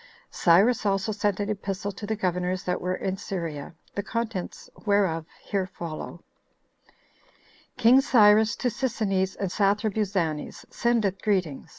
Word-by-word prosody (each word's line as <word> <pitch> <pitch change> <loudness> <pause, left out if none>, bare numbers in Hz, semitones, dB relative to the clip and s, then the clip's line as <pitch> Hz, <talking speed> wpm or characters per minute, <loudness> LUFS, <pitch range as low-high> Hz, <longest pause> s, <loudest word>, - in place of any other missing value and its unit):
Cyrus 200 +8 +4
also 195 +1 0
sent 205 -2 -1
an 205 +1 -1
epistle 200 0 -3
to 205 +1 -8
the 220 - -1
governors 180 -2 -1
that 180 - -2
were 180 +1 -1
in 190 0 -3
Syria, 165 -5 -5 0.2
the 200 - -2
contents 225 -3 -4 0.2
whereof 185 -6 +2 0.2
here 195 -3 -1
follow: 170 -4 -7 1.5
"King 250 +3 +6
Cyrus 215 -3 +5
To 250 - -1
Sisinnes 210 -6 -1
And 195 -3 -2
Sathrabuzanes 200 -6 0
Sendeth 220 -5 0
Greeting. 185 -9 -1
200 Hz, 125 wpm, -26 LUFS, 185-215 Hz, 1.5 s, King